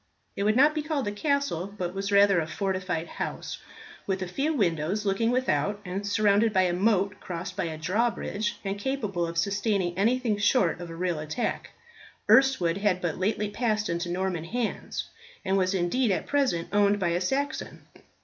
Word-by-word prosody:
It - - -3
would 215 +1 +3
not 295 +4 +5
be 305 - -1
called 300 -5 -2
a - - 0
castle, 205 - -1
but 180 -2 -3
was 195 +1 -3
rather 200 -2 +5
a 160 - -2
fortified 185 -1 -2
house, - - -5 0.5
with 190 -1 -1
a - - -4
few 275 - -1
windows 190 - 0
looking 200 +4 +1
without, 205 - 0
and 195 +3 -4
surrounded 210 +1 +3
by 190 -2 +3
a 180 -1 +1
moat 200 +1 +1
crossed 180 +1 -6
by 190 - -1
a 160 -1 -4
drawbridge, 210 +4 -1
and 195 +1 -2
capable 205 -8 -2
of 165 0 -6
sustaining 200 -1 0
anything 225 +2 +1
short 200 -5 +2
of 175 - -7
a 165 - -7
real 175 -2 -1
attack. 155 +10 -3 0.6
Erstwood 220 -7 +4
had 200 -3 +1
but 175 -2 -3
lately 210 +2 0
passed 215 -2 0
into 170 +1 -2
Norman 180 -2 -2
hands, 235 +5 -3 0.4
and 190 - +1
was 190 0 +1
indeed 190 +8 +1
at 190 - 0
present 265 -13 0
owned 205 0 +3
by 175 -3 +1
a 175 +1 0
Saxon. 270 +10 -2
200 Hz, 180 wpm, -27 LUFS, 180-220 Hz, 0.6 s, not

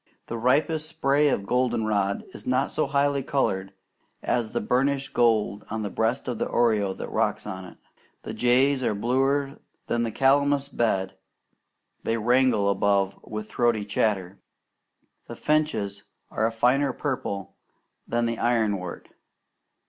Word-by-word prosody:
The 115 - -5
ripest 155 +6 +1
spray 145 -2 +2
of 100 -7 -1
goldenrod 110 -5 0
is 105 - -10
not 130 +2 +1
so 155 - 0
highly 140 0 +1
coloured 95 -9 -1 0.5
as 115 -3 0
the - - -1
burnished 135 +4 0
gold 110 -3 +2
on 110 0 -3
the 100 - -4
breast 115 +5 -1
of 120 -3 -3
the - - 0
oriole 105 -5 +1
that - - -7
rocks - - 0
on 95 0 -6
it. 90 - -13 0.5
The - - -6
jays 130 +3 +3
are 110 - 0
bluer 135 +5 0 0.3
than 120 - 0
the 115 - 0
calamus 140 +2 +2
bed 100 -7 -1 0.8
they 115 - -1
wrangle 120 -2 +3
above 100 0 +2
with 105 0 -6
throaty 120 -3 +1
chatter. 100 -2 -1 0.9
The - - -7
finches 110 -11 -1 0.3
are 110 - +1
a - - -2
finer 125 +5 +2
purple 100 -9 -4 0.5
than 120 0 0
the 115 0 -1
ironwort. 105 -7 0
120 Hz, 140 wpm, -25 LUFS, 105-135 Hz, 0.9 s, jays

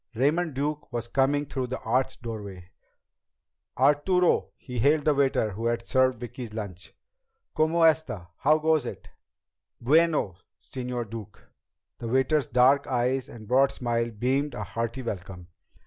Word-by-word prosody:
Raymond 150 +5 +1
Duke 145 +1 -3
was 120 -1 -3
coming 140 +3 +1
through 130 -2 -3
the 130 +1 -4
arched 130 +2 -1
doorway. 100 -6 -7 1.1
"Arturo!" 180 +5 +3
he 125 -3 -6
hailed 145 +4 +3
the 150 - +4
waiter 135 -6 +1
who 110 +4 -3
had 115 0 -2
served 130 -2 +2
Vicki's 120 -2 -7
lunch. 100 -4 -7 0.6
"Cómo 160 +2 +2
está? 125 - 0
How 155 +3 +4
goes 155 -4 +1
it?" - - -8 0.7
"Bueno, 150 - +2 0.2
Señor 125 -2 -5
Duke!" 110 -2 -9 0.6
The 115 - -5
waiter's 130 +3 +2
dark 130 +3 +4
eyes 125 +1 0
and 110 -3 -11
broad 135 +4 +4
smile 120 -1 -1
beamed 130 +5 -1
a 105 - -4
hearty 115 +6 -4
welcome. 90 -5 -6
125 Hz, 140 wpm, -27 LUFS, 115-145 Hz, 1.1 s, the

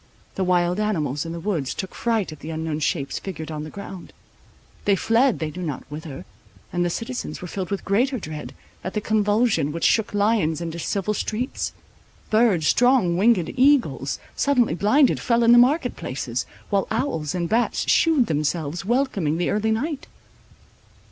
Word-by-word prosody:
The 190 - -1
wild 180 +1 +2
animals 160 -8 -1
in - - -5
the 170 - -5
woods 165 -8 -2
took 190 - -5
fright 225 -7 -1
at 155 - -10
the 155 - -8
unknown 160 -1 -3
shapes 140 -1 -1
figured 160 -4 -6
on 150 -1 -4
the 155 - -7
ground. 190 0 -9 0.7
They 200 - +4
fled 230 +5 +2
they 155 -1 -3
knew 180 - -7
not 150 -7 -4
whither; 150 -2 -7 0.5
and 175 0 +1
the 175 - +1
citizens 230 -3 -4
were 180 - -7
filled 185 0 -4
with 200 - -3
greater 250 +7 +1
dread, 155 -7 -7 0.3
at 185 - -5
the - - +2
convulsion 210 -6 +1
which 170 +2 -5
"shook 220 -2 +3
lions 205 -7 +2
into 170 0 -5
civil 200 +5 -1
streets;"—birds, 215 - -1
strong 245 - +4
winged 195 -2 +3
eagles, 250 - +2 0.2
suddenly 250 - +2
blinded, 245 - +3
fell 235 -1 +2
in 230 - +6
the 240 - +8
market 255 +1 +3
places, 125 -1 -4 0.2
while 200 -1 +1
owls 220 - -1
and 170 -1 -1
bats 230 +6 0
shewed 320 -6 +4
themselves 155 0 -1
welcoming 200 - 0
the 175 - 0
early 215 +1 0
night. 275 +7 -2
195 Hz, 170 wpm, -23 LUFS, 160-230 Hz, 0.7 s, the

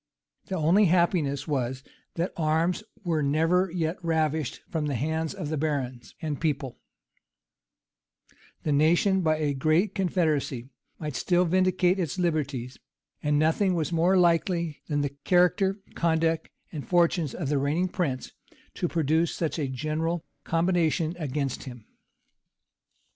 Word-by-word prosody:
The 190 - -3
only 175 +5 +4
happiness 165 -5 +2
was, 130 -3 -2 0.3
that 170 +3 -2
arms 165 +4 +1 0.2
were 165 -4 0
never 165 +6 +2
yet 170 +1 -2
ravished 160 -3 0
from 155 -3 -2
the 140 - -1
hands 160 +5 -2
of 150 - -5
the 155 - -1
barons 135 -5 -3
and 150 -3 -3
people: 140 -6 -2 1.8
the 155 - 0
nation, 170 +6 +3
by 155 -2 +2
a 150 -2 0
great 160 +8 +2
confederacy, 155 -9 0 0.3
might 150 -4 -5
still 180 +4 +2
vindicate 185 +1 +2
its 170 -1 -2
liberties: 140 -8 -2 0.4
and 150 -1 +1
nothing 165 +5 +2
was 165 0 -1
more 175 +3 +3
likely 170 -2 +2
than 145 -1 0
the 140 -1 -3
character, 185 +2 +3 0.2
conduct, 165 -1 +1 0.2
and 150 -4 -6
fortunes 170 -4 +2
of 155 -6 -3
the 145 -1 +2
reigning 150 +7 +1
prince, 150 -9 -2 0.4
to 175 - -1
produce 160 0 +1
such 165 -1 -2
a 145 - 0
general 155 +5 -2 0.2
combination 165 -1 +1
against 140 -3 -3
him. 120 -4 -10
160 Hz, 135 wpm, -27 LUFS, 145-175 Hz, 1.8 s, only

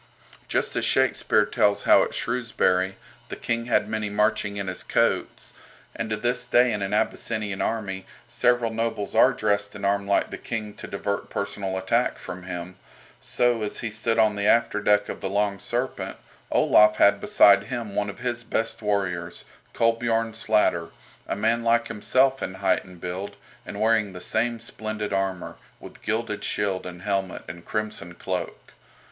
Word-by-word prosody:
Just - - 0
as - - 0
Shakespeare - - +3
tells 100 0 +1
how - - +6
at - - -1
Shrewsbury 95 -6 0 0.3
"the - - -5
King 115 0 -2
had 120 -3 +2
many 110 -1 -2
marching 105 0 0
in 100 - -3
his 90 -1 -4
coats," - - 0 0.4
and 110 - -3
to 110 - -1
this 120 +3 0
day 120 -1 +4
in 105 - -2
an 100 0 -2
Abyssinian 105 -1 -1
army 95 -4 -3 0.2
several 120 -1 +2
nobles 115 -2 -2
are - - +6
dressed 100 0 0
and 100 - -5
armed 100 0 0
like 100 - +2
the - - -6
King 110 -3 -4
to - - -9
divert 100 0 -3
personal 100 -1 -3
attack 115 +6 +1
from 90 +1 -8
him, 90 0 -7 0.4
so, 120 -2 +1
as 105 - -3
he 115 - -3
stood 115 +1 0
on 110 -2 +4
the 100 0 0
after 115 -2 +3
deck 105 0 +3
of - - -6
the 95 - -2
"Long 100 0 0
Serpent," 120 +6 -3 0.3
Olaf 105 0 +5
had 100 -1 +4
beside 100 -1 +5
him 120 -4 -5
one 105 0 -1
of 100 - -8
his 120 -1 -3
best 115 0 -2
warriors, 95 -5 -2 0.3
Kolbiorn 115 -1 +1
Slatter, 95 -6 +1 0.4
a - - -1
man 115 +3 +1
like 115 0 +2
himself 130 +5 +2
in 95 - -4
height 95 +1 +1
and 90 -2 -14
build, 95 +4 -5 0.3
and 100 - -6
wearing 110 -2 +2
the 90 - -8
same 115 +4 0
splendid 110 -2 -5
armour, 95 -2 -2 0.2
with - - -13
gilded 110 -1 -2
shield 95 -3 -1
and 90 0 -9
helmet 95 -2 -2
and 85 +2 -9
crimson 105 -5 -4
cloak. 90 -2 -5
105 Hz, 170 wpm, -25 LUFS, 95-115 Hz, 0.4 s, how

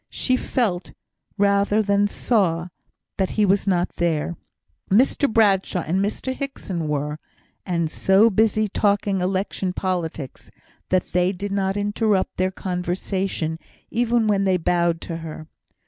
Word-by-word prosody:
She 255 - 0
felt, 215 -9 -1 0.4
rather 200 +1 +3
than 200 0 +2
saw, 180 -6 0 0.5
that 190 - +1
he 210 - +4
was 200 +1 +2
not 180 -2 0
there. 170 0 0 0.5
Mr 260 +6 +3
Bradshaw 195 -5 +3
and 170 +4 -1
Mr 220 +5 -2
Hickson 195 - -4
were, 150 +1 -2 0.5
and 170 -3 0
so 195 +7 +4
busy 215 +1 +2
talking 200 -1 +1
election 190 0 -1
politics 170 -8 -4 0.4
that 185 -1 0
they 180 +1 +2
did 200 +1 -5
not 195 0 0
interrupt 205 -1 0
their 185 0 +1
conversation 180 -2 -2 0.3
even 235 -1 +2
when 205 -2 +2
they 190 -1 +3
bowed 170 -1 +1
to 165 - -5
her. 160 -1 -8
190 Hz, 130 wpm, -23 LUFS, 175-205 Hz, 0.5 s, he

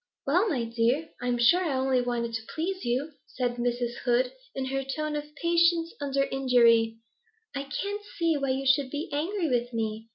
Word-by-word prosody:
'Well, 360 +10 +3
my 260 -8 0
dear, 235 +7 0
I'm 245 -1 0
sure 345 +11 +5
I 290 -6 0
only 260 -1 +2
wanted 240 -1 -2
to 225 - -2
please 370 +4 -2
you,' 255 +6 -1 0.2
said 245 -1 -2
Mrs. 240 0 -1
Hood, 250 +1 +2 0.2
in 265 - -2
her 270 +1 -2
tone 305 +3 -3
of 295 0 -3
patience 335 0 +2
under 275 -1 +1
injury. 235 -4 +3 0.6
'I 275 0 -3
can't 400 +9 -3 0.2
see 335 -2 +2
why 275 -2 -1
you 265 +1 -1
should 270 0 +3
be 295 +4 -4
angry 335 +5 -1
with 245 -2 0
me. 220 0 -3
270 Hz, 185 wpm, -28 LUFS, 240-310 Hz, 0.6 s, sure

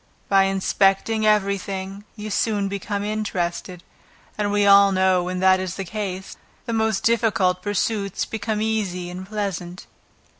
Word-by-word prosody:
By 195 -1 +5
inspecting 195 +3 +1
every 200 -2 +2
thing 195 +1 -6
you 215 -1 -6
soon 205 -1 0
become 200 +1 -3
interested, 185 -4 -3 0.5
and 205 -1 -1
we 205 0 +2
all 200 0 +7
know 185 -1 +3
when 180 +1 -3
that 190 0 +5
is 185 -1 -4
the 195 - -5
case, 190 0 -5 0.3
the 235 - -3
most 220 0 0
difficult 215 -5 +2
pursuits 205 0 -1
become 220 -1 -3
easy 190 -5 -2
and 185 +1 -8
pleasant. 190 -4 -4
200 Hz, 145 wpm, -23 LUFS, 185-210 Hz, 0.5 s, all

